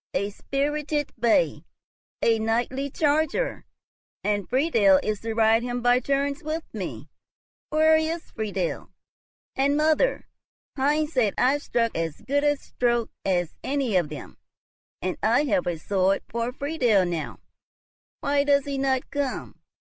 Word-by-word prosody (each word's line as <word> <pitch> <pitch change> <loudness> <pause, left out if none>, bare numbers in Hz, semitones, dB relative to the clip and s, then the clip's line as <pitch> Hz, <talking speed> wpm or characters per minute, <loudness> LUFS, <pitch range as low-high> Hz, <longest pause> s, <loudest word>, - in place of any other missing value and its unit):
a 200 +2 0
spirited 295 +5 -2
bay, 235 - +2 0.6
a 225 -1 +3
knightly 240 +5 -1
charger, 315 - 0 0.6
and 205 -2 -1
Friedel 230 - +4
is 215 -1 -1
to 225 0 -4
ride 225 0 +4
him 245 0 -3
by 245 +1 +4
turns 280 +1 -1
with 310 +2 -3
me. - - -6 0.6
Where 315 +1 +5
is 320 +1 -3
Friedel? 200 -6 -3 0.7
And, 280 +2 +2
mother, 315 +11 +2 0.5
Heinz 300 +3 +1
said 225 -6 +2
I 270 +3 +3
struck 230 -5 -1
as 165 -2 -3
good 285 +2 0
a 290 0 +3
stroke 240 -3 -1
as 175 -3 0
any 270 -6 -1
of 175 -5 +2
them, 150 -2 -9 0.7
and 185 0 -2
I 230 +7 +3
have 285 -4 0
a 175 -2 -1
sword 195 +3 +1
for 235 +1 -2
Friedel 250 - +1
now. 170 -3 -4 0.8
Why 280 0 +2
does 280 -1 +3
he 280 -1 -3
not 265 -1 0
come? 285 -3 -3
260 Hz, 140 wpm, -25 LUFS, 215-290 Hz, 0.8 s, Where